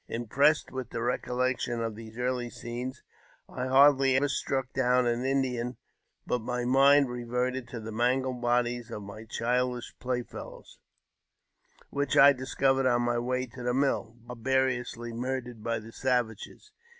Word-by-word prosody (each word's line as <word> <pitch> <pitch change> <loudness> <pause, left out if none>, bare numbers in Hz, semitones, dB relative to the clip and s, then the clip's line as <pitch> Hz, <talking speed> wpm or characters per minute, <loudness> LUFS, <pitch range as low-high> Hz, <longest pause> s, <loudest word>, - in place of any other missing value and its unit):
Impressed 140 +7 +2
j - - -18
with 130 -3 -5
the - - -4
recollection 125 0 -1
of 115 -1 -2
these 110 +1 -11
early 125 -1 -1
scenes, 120 +2 -6 0.4
I 125 0 -4
hardly 135 0 +5
ever 140 +2 +2
struck! 135 -1 -2
down 125 -1 +3
an 120 +1 0
Indian 130 -2 -1 0.5
but 125 - 0
my 125 +1 -2
mind 140 +2 +5
reverted 125 +1 -2
to 120 0 -7
the 110 0 -7
mangled 125 +2 0
bodies; 120 0 0
of 105 -3 -6
my 100 +3 -9
childish 125 +1 -1
play 125 -1 -2
fellows, - - -11 1.1
which 140 0 0
I 140 +1 +9
discovered 135 0 +1
on 120 -1 +2
my 120 0 +1
way 125 +1 -1
to 125 +1 -11
the 125 0 0
mill, 130 -4 0
barbarously 125 -1 -1
murdered 125 -2 -4
by 115 0 -1
the 110 +1 -9
savages. 125 - -2
125 Hz, 150 wpm, -29 LUFS, 120-130 Hz, 1.1 s, I